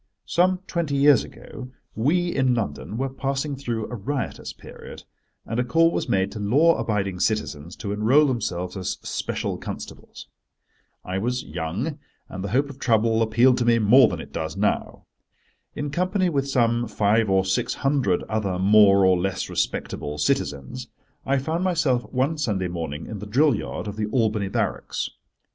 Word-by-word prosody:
Some 180 +1 +2
twenty 170 -7 -2
years 140 0 +5
ago 125 -1 -10 0.2
we, 170 +10 +1
in 130 -2 +2
London, 100 -1 -4
were 135 +2 0
passing 135 +2 -3
through 120 -5 -3
a - - -6
riotous 125 +5 -4
period, - - -12 0.4
and 115 - -3
a - - +3
call 165 +7 +3
was - - -2
made 95 0 +1
to 110 - -7
law 145 +12 +4
abiding 100 -4 -1
citizens 85 -6 -2
to 100 -1 -4
enrol 120 +9 +4
themselves 90 -9 -2
as 95 -2 -3
special - - -3
constables. - - -8 0.8
I 95 +1 -2
was 125 +4 -1
young, 90 - -4 0.3
and 95 - -6
the 100 - -3
hope 140 +6 +1
of 135 - -15
trouble 115 -2 +2
appealed 120 +3 +4
to 120 - +1
me 120 -1 +4
more 115 +3 +6
than - - -4
it - - -10
does 80 -1 -4
now. - - -1 0.7
In 145 -1 -3
company 185 +3 +1
with 140 -3 -1
some 120 -2 +2
five 105 +1 +2
or 95 0 +3
six 95 - 0
hundred 135 -10 +1
other 105 -4 -2
more 100 0 +6
or 95 -1 +4
less 95 0 -2
respectable 75 0 -2
citizens, 70 -2 -2 0.4
I 135 +1 +2
found 160 +6 -1
myself 160 -9 +1
one 135 +5 0
Sunday 100 -10 -1
morning 80 -3 -5
in 110 - -7
the 105 - -7
drill 140 +8 +3
yard - - -4
of 105 0 -6
the 105 -1 -1
Albany 110 -4 0
Barracks. - - -2
115 Hz, 170 wpm, -24 LUFS, 95-140 Hz, 0.8 s, more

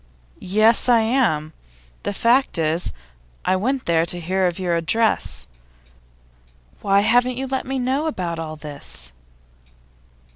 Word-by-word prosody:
'Yes, 215 +6 +3
I 235 -2 +6
am. 220 - +1 0.5
The - - -3
fact 235 +4 +2
is, 160 +1 0 0.5
I 185 - +3
went 255 +7 -1
there 165 -1 +2
to 175 +1 -1
hear 185 +2 0
of 175 - -3
your 180 -2 0
address. 220 +7 0 1.4
Why 200 0 +3
haven't 245 +3 +2
you 265 - -2
let 265 0 -3
me 270 0 -2
know 265 +5 0
about 175 - -3
all 155 -1 -5
this? 145 - -6
195 Hz, 135 wpm, -21 LUFS, 165-245 Hz, 1.4 s, I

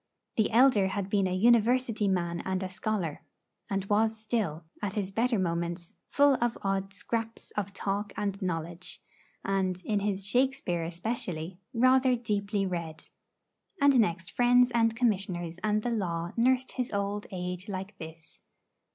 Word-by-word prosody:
The 220 - +2
elder 230 -5 +5
had 195 0 -3
been 195 -2 +3
a 185 - -1
University 235 +1 +3
man 170 -3 0
and 190 0 -1
a 185 - -3
scholar, 185 -5 -2 0.5
and 195 -1 -1
was 220 +2 +2
still, 215 -8 -2 0.2
at 200 -1 -2
his 200 -2 -2
better 230 +3 +1
moments, 170 -1 -2
full 285 -2 +4
of 240 -1 0
odd 195 0 -1
scraps 225 +3 -4
of 200 -1 -3
talk 200 +1 -2
and 200 0 -2
knowledge, 170 -1 -4 0.5
and, 190 -2 0
in 210 -2 +1
his 200 -1 -2
Shakespeare 245 -7 +1
especially, 175 -1 -4
rather 255 +1 +4
deeply 205 -3 -1
read. 170 -4 -5 0.7
And 280 -3 +5
next 185 -4 0
friends 245 0 +4
and 225 -1 +2
Commissioners 185 -7 0
and 215 0 +1
the 245 - -1
law 175 -6 -2
nursed 255 +2 +2
his 250 -2 -3
old 200 0 -2
age 180 +1 -5
like 195 +1 -5
this. 160 -1 -11
200 Hz, 150 wpm, -29 LUFS, 185-230 Hz, 0.7 s, elder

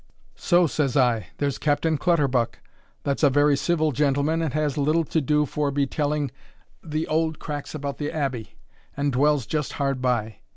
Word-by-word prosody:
So, 175 -1 +3
says 145 -3 0
I, 120 -7 +2
there's 140 -2 -1
Captain 155 +2 +1
Clutterbuck, 140 -8 +1 0.5
that's 140 -1 -1
a 145 - +6
very 145 +1 +4
civil 155 +1 +1
gentleman 145 +4 +1
and 160 -4 -1
has 150 -2 0
little 155 +3 +2
to 160 +1 -1
do 150 +2 +2
forby 145 -1 0
telling 145 -1 -1 0.5
a' - - -16
the 155 +1 -2
auld 160 0 0
cracks 145 0 -6
about 140 -2 -5
the 150 0 -2
Abbey, 135 -7 -3 0.4
and 140 0 0
dwells 140 0 +2
just 150 +2 -2
hard 135 -2 -1
by. 120 -4 -1
145 Hz, 170 wpm, -24 LUFS, 135-155 Hz, 0.5 s, a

